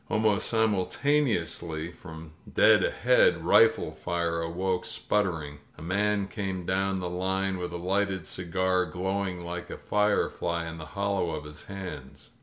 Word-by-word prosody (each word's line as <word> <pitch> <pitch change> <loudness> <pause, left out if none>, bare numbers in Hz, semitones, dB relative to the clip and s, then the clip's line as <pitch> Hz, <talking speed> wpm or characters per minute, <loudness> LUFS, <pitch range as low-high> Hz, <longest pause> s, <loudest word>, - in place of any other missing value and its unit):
Almost 105 -1 +2
simultaneously 100 - 0
from 80 -2 -11 0.2
dead - - +5
ahead - - +3
rifle - - +5
fire 85 -1 -2
awoke 90 +2 -1
sputtering. 80 -8 -1 0.2
A - - -10
man 100 +3 +1
came 95 -4 -4
down 95 +1 0
the 90 -1 -3
line 95 +1 -1
with 90 -1 -4
a 85 - -4
lighted 95 0 -1
cigar 90 +2 0
glowing 95 +1 -2
like 85 0 -5
a - - -6
firefly 95 -5 0
in 80 0 -7
the 75 - -8
hollow 100 -3 0
of 75 - -6
his 75 0 -10
hands. 95 -2 -8
90 Hz, 140 wpm, -28 LUFS, 85-100 Hz, 0.2 s, dead